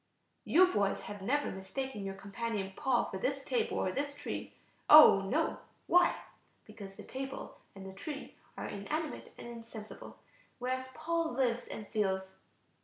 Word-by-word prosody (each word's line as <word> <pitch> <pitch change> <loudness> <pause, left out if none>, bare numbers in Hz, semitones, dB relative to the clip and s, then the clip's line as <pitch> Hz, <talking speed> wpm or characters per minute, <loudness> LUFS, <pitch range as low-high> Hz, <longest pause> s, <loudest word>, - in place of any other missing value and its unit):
] - - -45
"You 365 +2 +7
boys 200 -1 +1
have 205 -1 -7
never 285 +9 0
mistaken 210 +4 -5
your 195 0 -4
companion 200 0 -4
Paul 255 -3 +2
for 190 - -5
this 270 +5 -1
table 250 -2 0
or 185 - 0
this 285 +5 -2
tree? 290 - -5 0.3
Oh, 300 -10 +10
no! 315 +6 +1 0.3
Why? 355 0 +5 0.5
Because 195 -3 -10
the - - -10
table 270 +1 -6 0.2
and 195 -1 -9
the 190 - -8
tree 280 +9 -7 0.2
are - - -4
inanimate 300 +11 -4
and - - -9
insensible, 230 -2 -9 0.4
whereas 255 +1 -2
Paul 330 0 -1
lives 245 -2 +1
and 215 - -7
feels. 190 -3 0
240 Hz, 155 wpm, -33 LUFS, 195-285 Hz, 0.5 s, Oh